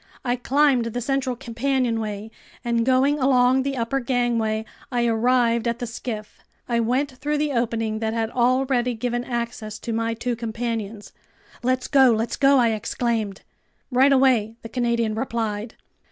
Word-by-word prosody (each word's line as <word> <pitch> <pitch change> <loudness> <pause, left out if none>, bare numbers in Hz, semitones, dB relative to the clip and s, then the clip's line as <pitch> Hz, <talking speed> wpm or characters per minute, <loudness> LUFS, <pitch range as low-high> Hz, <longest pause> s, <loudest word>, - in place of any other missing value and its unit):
I 245 0 +1
climbed 265 0 +2
the 230 +1 -3
central 260 +1 -1
companionway, 230 -4 -2 0.3
and 235 -1 +1
going 270 +3 +3
along 260 -1 +4
the 275 0 -2
upper 235 +3 0
gangway, 235 -3 0 0.3
I 240 -1 +1
arrived 235 0 +2
at 235 0 0
the 245 - -4
skiff. 225 -2 -6 0.3
I 235 -1 +1
went 255 +5 0
through 290 +4 -2
the 295 0 0
opening 225 -3 -1
that 220 0 -1
had 225 0 -1
already 250 0 +1
given 240 +1 -2
access 235 -3 -4
to 230 - -5
my 230 0 -1
two 240 +1 -2
companions. 225 -2 -4 0.5
"Let's 255 +1 0
go, 270 -3 +5
let's 225 0 0
go!" 275 0 +4
I 240 -2 +4
exclaimed. 220 -1 -2 0.5
"Right 260 +3 +5
away!" 255 -5 +3
the 230 - -7
Canadian 235 -2 0
replied. 225 -2 -3
240 Hz, 155 wpm, -23 LUFS, 225-255 Hz, 0.5 s, go